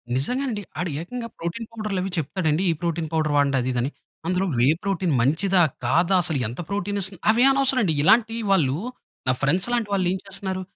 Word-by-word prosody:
నిజంగానండి. 240 Hz, -, -1 dB, 0.2 s
ఆడు 180 Hz, -1 st, -1 dB
ఏకంగా 235 Hz, +6 st, -6 dB
ప్రోటీన్ 175 Hz, +7 st, -5 dB
పౌడర్‌లవి 205 Hz, -4 st, -3 dB
చెప్తాడండి. 160 Hz, +2 st, 0 dB
ఈ -, -, +1 dB
ప్రోటీన్ 170 Hz, -2 st, -2 dB
పౌడర్ 155 Hz, -2 st, +1 dB
వాడండి 140 Hz, -1 st, +3 dB
అది 125 Hz, -, -2 dB
ఇదని. 125 Hz, +3 st, -1 dB, 0.4 s
అందులో 185 Hz, +1 st, +1 dB, 0.2 s
ఏ -, -, +5 dB
ప్రోటీన్ 185 Hz, -4 st, 0 dB
మంచిదా? 175 Hz, +8 st, +2 dB, 0.2 s
కాదా? 170 Hz, +9 st, +3 dB
అసలు 160 Hz, -5 st, 0 dB
ఎంత 120 Hz, -, -8 dB
ప్రోటీన్ 205 Hz, 0 st, -2 dB
ఇస్తుంది? 190 Hz, -1 st, -3 dB
అవేం 245 Hz, +4 st, +4 dB
అనవసరమండి. 255 Hz, -, +2 dB
ఇలాంటి 225 Hz, +6 st, +4 dB
వాళ్ళు 145 Hz, -7 st, +3 dB, 0.5 s
నా -, -, +4 dB
ఫ్రెండ్స్‌ 180 Hz, -, +1 dB
లాంటి 235 Hz, -3 st, 0 dB
వాళ్ళెం 185 Hz, -1 st, +1 dB
చేస్తున్నారు? 190 Hz, -1 st, -4 dB
185 Hz, 165 wpm, -24 LUFS, 160-205 Hz, 0.5 s, ఏ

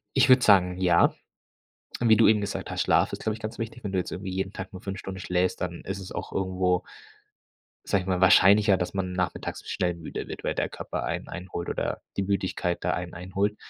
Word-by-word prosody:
Ich 135 Hz, 0 st, +5 dB
würde 130 Hz, 0 st, +7 dB
sagen, 90 Hz, -4 st, +5 dB
ja. 90 Hz, -2 st, +4 dB, 0.9 s
Wie 115 Hz, -2 st, +6 dB
du 115 Hz, -, +6 dB
eben 110 Hz, -1 st, +5 dB
gesagt 100 Hz, 0 st, -4 dB
hast, -, -, -1 dB
Schlaf -, -, +3 dB
ist, -, -, -6 dB
glaube 110 Hz, -, 0 dB
ich, 110 Hz, -, -9 dB
ganz 110 Hz, +2 st, -6 dB
wichtig, 115 Hz, +1 st, -6 dB
wenn 100 Hz, -, -3 dB
du 95 Hz, -, -1 dB
jetzt 90 Hz, -, -2 dB
irgendwie 95 Hz, +1 st, -5 dB
jeden 95 Hz, +1 st, -3 dB
Tag 95 Hz, 0 st, -7 dB
nur 95 Hz, -, -9 dB
5 100 Hz, 0 st, -5 dB
Stunden 95 Hz, 0 st, -7 dB
schläfst, 90 Hz, 0 st, 0 dB
dann 90 Hz, -2 st, -4 dB
ist 95 Hz, +1 st, -5 dB
es 95 Hz, -, -8 dB
auch -, -, -5 dB
irgendwo 95 Hz, -1 st, 0 dB, 1.0 s
sage 100 Hz, -, +1 dB
ich -, -, -11 dB
mal, 90 Hz, -1 st, +1 dB
wahrscheinlicher, 100 Hz, +2 st, +6 dB
dass 90 Hz, 0 st, -3 dB
man 95 Hz, -1 st, -2 dB
nachmittags 90 Hz, -1 st, -3 dB
schnell 90 Hz, -1 st, 0 dB
müde 85 Hz, -1 st, -7 dB
wird, -, -, -8 dB
weil -, -, 0 dB
der -, -, -1 dB
Körper -, -, -5 dB
einen -, -, -3 dB
einholt 90 Hz, -1 st, -6 dB
oder -, -, -2 dB, 0.2 s
die 100 Hz, -, +1 dB
Müdigkeit 95 Hz, -2 st, -1 dB
da -, -, +1 dB
einen 90 Hz, -1 st, -4 dB
einholt. 95 Hz, +4 st, -2 dB
95 Hz, 225 wpm, -26 LUFS, 90-100 Hz, 1.0 s, würde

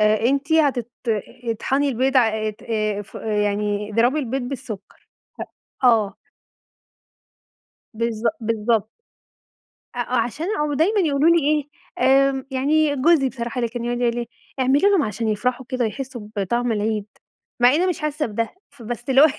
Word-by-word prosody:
آآ، 215 Hz, 0 st, +4 dB
أنتِ 280 Hz, +3 st, 0 dB
هتت 270 Hz, -7 st, +2 dB, 0.5 s
اطحني 265 Hz, +5 st, 0 dB
البيض 260 Hz, +2 st, +1 dB
ع 235 Hz, -3 st, +6 dB
آآ 215 Hz, 0 st, -1 dB
ت 210 Hz, -, -17 dB, 0.4 s
فو -, -, -10 dB
يعني 210 Hz, -1 st, -1 dB
اضربي 240 Hz, +7 st, +2 dB
البيض 265 Hz, -1 st, -2 dB
بالسكر، 245 Hz, -5 st, -8 dB, 0.8 s
هأ -, -, +8 dB
آه. 215 Hz, -5 st, +3 dB, 1.8 s
بالض 230 Hz, 0 st, -2 dB, 0.2 s
بالضبط. 220 Hz, 0 st, 0 dB, 1.1 s
أ -, -, -5 dB
آه 245 Hz, +1 st, -1 dB
عشان 240 Hz, +8 st, -1 dB
أو 300 Hz, -1 st, 0 dB
دايمًا 380 Hz, +9 st, +2 dB
يقولوا 305 Hz, -2 st, +3 dB
لي 335 Hz, -, +5 dB
إيه، 295 Hz, -1 st, 0 dB, 0.6 s
آمم، 270 Hz, 0 st, -4 dB
يعني 290 Hz, +3 st, +2 dB
جوزي 275 Hz, -1 st, +3 dB
بصراحة 240 Hz, 0 st, -4 dB
اللي 235 Hz, -1 st, 0 dB
كان 235 Hz, 0 st, -5 dB
يقعُد 240 Hz, 0 st, -2 dB
يقول 235 Hz, -1 st, +2 dB
لي -, -, -2 dB
إيه: 235 Hz, -, -6 dB, 0.3 s
"اعملي 270 Hz, +9 st, +4 dB
لهم 390 Hz, -7 st, +3 dB
عشان 220 Hz, +1 st, -3 dB
يفرحوا 250 Hz, +4 st, -1 dB
كده 255 Hz, -3 st, 0 dB
ويحسّوا 245 Hz, -2 st, -6 dB
بطعم 235 Hz, +5 st, 0 dB
العيد." 215 Hz, -1 st, -1 dB, 0.5 s
مع 245 Hz, 0 st, +7 dB
إنّي 355 Hz, +4 st, +2 dB
مش 355 Hz, -, -1 dB
حاسّة 300 Hz, 0 st, -1 dB
بده، 230 Hz, -, -3 dB
فبس 240 Hz, -2 st, -7 dB
اللي 265 Hz, +1 st, +6 dB
هو -, -, +9 dB
245 Hz, 160 wpm, -22 LUFS, 220-280 Hz, 1.8 s, هو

